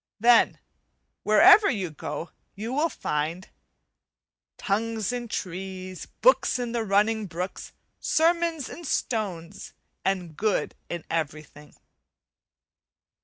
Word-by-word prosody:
Then 235 +2 +5 0.6
wherever 390 - +7
you 195 - -2
go 150 +2 -6 0.2
you 220 +5 -5
will 305 +4 +2
find 160 - -3 1.1
"Tongues 220 +1 -1
in 240 -1 -4
trees, 185 -2 -6
books - - +4
in 245 -1 -3
the 235 -1 -1
running 210 +1 +2
brooks 180 +2 -5 0.3
Sermons 330 -3 +1
in 345 - -9
stones, 200 - -3 0.3
and 180 -5 -1
good 215 +3 0 0.2
in 170 -1 -5
everything." 150 -2 -5
200 Hz, 100 wpm, -26 LUFS, 175-240 Hz, 1.1 s, wherever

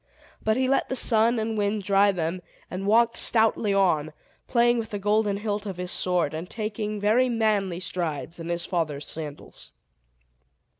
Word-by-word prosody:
But 220 +1 +1
he 260 0 +1
let 275 - +1
the 260 - -1
sun 230 -1 +3
and 220 0 -2
wind 205 0 -1
dry 200 +1 +4
them, 175 0 -3 0.3
and 190 +2 -4
walked 230 +2 +4
stoutly 220 -2 +3
on, 160 -6 +2 0.3
playing 240 -1 +3
with 220 -1 -5
the 205 - -4
golden 205 0 +1
hilt 205 0 -3
of 190 -3 -5
his 180 0 -4
sword, 180 -5 0
and 165 +4 -6
taking 215 -1 -4
very 225 +5 +3
manly 210 -6 0
strides 165 -4 -4
in 165 0 -6
his 170 0 -2
father's 155 -5 -2
sandals. 150 -2 -8
205 Hz, 165 wpm, -25 LUFS, 175-220 Hz, 0.3 s, dry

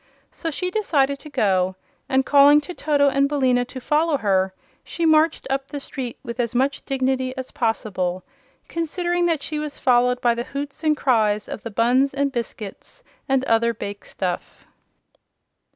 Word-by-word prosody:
So 330 - -4
she 365 +4 -3
decided 280 -10 +1
to 300 - -11
go, 190 -7 +1 0.3
and 265 0 +2
calling 285 +1 +7
to 360 - -8
Toto 290 -3 +2
and 275 0 +2
Billina 260 -4 +2
to 260 +1 -8
follow 300 +3 +1
her 190 -4 +1 0.3
she 340 - -3
marched 315 0 +3
up 270 0 -2
the 290 - -5
street 260 -3 -6
with 235 +1 -7
as 240 0 -1
much 270 +3 +1
dignity 260 -1 -1
as 260 -1 -6
possible, 190 -6 -1 0.4
considering 345 +1 -1
that 320 -4 0
she 305 -1 -3
was 300 -1 -5
followed 250 0 +3
by 240 -1 +3
the 235 0 -3
hoots 285 +2 -5
and 305 -1 +2
cries 215 -6 +2
of - - -6
the 230 - -6
buns 250 +5 +2
and 280 0 +1
biscuits 230 -5 -7 0.3
and 265 0 +2
other 230 -1 +2
bake 205 -1 -6
stuff. 180 -2 -5
265 Hz, 170 wpm, -22 LUFS, 235-290 Hz, 0.4 s, calling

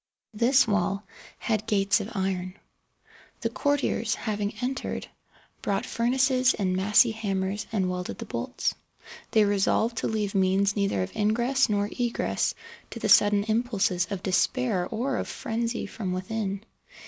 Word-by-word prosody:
This 240 +4 +4
wall 200 -1 0 0.3
had 220 -1 -1
gates 200 -1 +3
of 205 0 -5
iron. 190 -1 -2 0.9
The - - -1
courtiers, 285 -6 0
having 210 -2 -3
entered, 255 +2 -3 0.6
brought 200 -1 -1
furnaces 255 +2 +2
and 185 -3 0
massy 210 +5 +4
hammers 205 -1 -2
and 195 -4 +1
welded 180 0 -4
the - - -6
bolts. - - -2 0.6
They 215 -2 +4
resolved 205 +3 +1
to - - 0
leave 210 -2 -1
means 195 +1 +2
neither 195 - +1
of 90 - -7
ingress 240 +5 +2
nor 205 -1 +1
egress 240 -1 0 0.3
to - - -8
the 215 - -1
sudden 205 0 +6
impulses 215 -5 0
of 195 -3 -4
despair 190 0 +1
or 245 +4 -1
of - - -3
frenzy 235 -2 -3
from 185 -5 -4
within. 200 +2 -3
210 Hz, 140 wpm, -27 LUFS, 195-235 Hz, 0.9 s, sudden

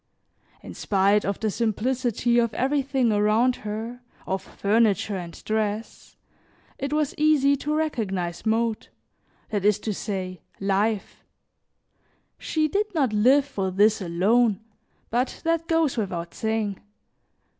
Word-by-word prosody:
In - - -8
spite 200 +1 +2
of 200 -1 -2
the 215 -1 -1
simplicity 240 +2 0
of 230 -2 0
everything 270 -2 +1
around 215 +4 +3
her, 220 +4 -6 0.2
of 190 0 -2
furniture 210 -1 +1
and 175 -3 -7
dress, 215 0 -3 0.6
it 275 +1 -3
was 300 -1 0
easy 295 -2 +4
to 300 +2 -2
recognize 195 - -2
mode, 225 0 0 0.6
that 205 -3 -2
is 210 -1 +4
to 215 - -2
say, 185 -4 -4 0.2
life; 200 +2 -1 1.2
she 310 -1 0
did 410 +5 -1
not 270 -8 +1
live 260 +7 +4
for 195 -9 -3
this 210 +3 +3
alone, 195 +5 +2 0.5
but 245 +3 -1
that 330 0 0
goes 325 -6 +1
without 175 -6 -3
saying. 220 -3 -2
220 Hz, 125 wpm, -25 LUFS, 200-265 Hz, 1.2 s, easy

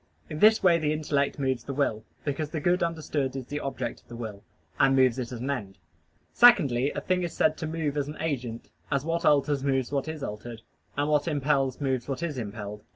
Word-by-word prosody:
In 155 - -4
this 220 +3 +6
way 170 -2 +5
the 150 -1 +1
intellect 145 -2 0
moves 130 -3 -1
the 140 - -5
will, 110 -6 0 0.2
because 145 +1 -2
the 160 - -3
good 175 +5 +2
understood 155 -5 -1
is 135 -2 -4
the 145 +3 -4
object 130 -4 -4
of - - -34
the 120 - -9
will, 110 -4 -7 0.4
and 135 0 +5
moves 130 -2 +4
it 120 -1 -4
as 120 - -5
an 135 +3 -1
end. 100 -8 -5 0.6
Secondly, 145 - +5
a - - -2
thing 185 -1 0
is 175 -2 -3
said 155 0 +2
to 160 - -4
move 155 -2 -2
as 145 -1 -1
an 150 - -7
agent, 125 -7 -4 0.2
as 140 0 0
what 165 +1 -1
alters 145 -1 +3
moves 135 -2 0
what 140 +1 -1
is 155 -2 -5
altered, 110 +2 -6 0.3
and 145 +1 +1
what 150 0 +2
impels 140 -3 +1
moves 130 -4 -1
what 140 +4 -3
is 150 -6 -2
impelled. 105 -1 -6
140 Hz, 220 wpm, -27 LUFS, 125-155 Hz, 0.6 s, this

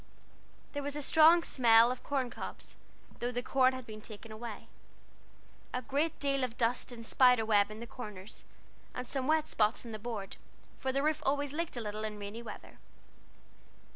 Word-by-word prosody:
There 285 - -2
was 285 0 -3
a 295 - -3
strong 325 +3 +6
smell 235 -3 +5
of 255 - -5
corn 265 -4 -1
cobs, - - -7 0.4
though 240 +1 -1
the 245 0 -3
corn 260 -1 +3
had 260 -1 -6
been 215 -1 -9
taken 220 +1 -11
away, 220 0 -7 1.1
a 250 - -2
great 290 +5 0
deal 275 -2 +1
of 245 -2 -3
dust 240 +2 +1
and 230 -1 -8
spiderweb 225 -5 +4
in 215 +1 -9
the - - -5
corners, 210 -5 -9 0.5
and 250 0 -5
some 265 0 0
wet 315 0 +2
spots 215 +2 +1
on 230 - -7
the 215 - -6
boards; 210 -3 -6 0.4
for 265 - -1
the 275 +1 0
roof 310 0 +1
always 285 0 0
leaked 330 -4 -3
a - - -2
little 215 0 -4
in 215 -1 -4
rainy 205 +3 -6
weather. 220 -3 -10
245 Hz, 180 wpm, -32 LUFS, 220-275 Hz, 1.1 s, strong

